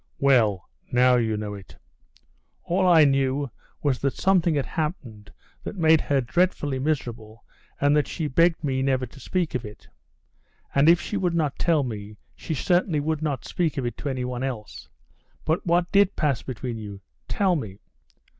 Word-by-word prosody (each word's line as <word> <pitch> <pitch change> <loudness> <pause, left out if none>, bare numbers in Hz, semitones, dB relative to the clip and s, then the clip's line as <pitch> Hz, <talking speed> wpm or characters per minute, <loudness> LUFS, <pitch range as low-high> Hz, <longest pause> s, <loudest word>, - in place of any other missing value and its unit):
"Well, 110 -9 +3 0.2
now 125 0 +4
you 110 -3 0
know 105 -1 -4
it." 100 -2 -12 0.9
"All 185 +2 +1
I 165 -4 +7
knew 135 -1 +1 0.3
was 140 -4 +1
that 140 -1 -1
something 180 -4 +2
had 140 - 0
happened 135 - -5 0.3
that - - -6
made 160 -3 +4
her 140 -2 +1
dreadfully 145 -1 0
miserable, 120 -6 -3 0.3
and 145 +1 +3
that 150 - +2
she 160 - -4
begged 165 +3 +2
me 130 -2 0
never 130 -1 +1
to 125 +3 -15
speak 175 +5 -2
of 125 - -2
it. 105 -2 -11 0.9
And 140 +3 +5
if 170 +1 +6
she 205 - -4
would 180 -3 0
not 150 -4 -1
tell 165 -4 +2
me, 105 -3 -6 0.2
she 160 - -5
would - - -3
certainly 175 -3 +2 0.2
not 145 -5 -2
speak 165 -4 -1
of 130 - -1
it 120 - -3
to 145 - -4
anyone 125 -2 -3
else. 125 -6 -6 0.6
But 160 +3 -1
what 175 +1 +2
did 200 -2 +4
pass 140 -7 0
between 125 -2 -5
you? 100 -2 -8 0.3
Tell 190 -3 +1
me." 105 - -5
140 Hz, 175 wpm, -25 LUFS, 120-165 Hz, 0.9 s, I